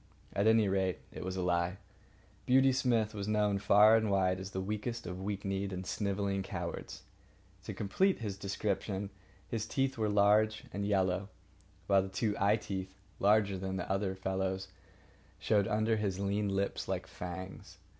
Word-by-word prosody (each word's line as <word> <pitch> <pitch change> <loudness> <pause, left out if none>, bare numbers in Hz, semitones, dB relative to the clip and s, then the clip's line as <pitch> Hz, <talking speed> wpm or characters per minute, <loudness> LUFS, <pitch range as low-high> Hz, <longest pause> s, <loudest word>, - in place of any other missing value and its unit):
At 100 +2 +2
any 110 -1 +5
rate, 95 -1 +1
it - - -7
was 95 0 -3
a 90 - -1
lie. 85 +1 0 0.7
Beauty 130 +1 +5
Smith 120 -5 +1
was 100 -1 -4
known 105 -2 +2
far 105 +2 +6
and 110 -1 +2
wide 95 -1 +2
as 95 0 -6
the 95 - -4
weakest 105 +4 -3
of 90 0 -5
weak 100 0 -4
kneed 95 0 -2
and 95 0 -5
snivelling 100 0 -1
cowards. 85 -3 -6 0.6
To - - -4
complete 190 - +1
his 105 -4 -4
description, 100 0 -2 0.4
his 110 -1 -3
teeth 135 -1 -1
were 110 -1 +1
large 105 +2 +3
and 100 0 -2
yellow, 95 -1 +1 0.6
while 100 -1 +4
the 95 - -5
two 105 +1 -1
eye 100 +2 +4
teeth, 95 -3 -5 0.2
larger 100 -1 +3
than 95 0 -3
their 95 +1 -1
fellows, 95 0 -2 0.7
showed 105 -2 +2
under 110 +1 +1
his 100 -3 -1
lean 100 +1 0
lips 100 0 -1
like - - -2
fangs. 95 +1 -8
100 Hz, 165 wpm, -32 LUFS, 95-105 Hz, 0.7 s, far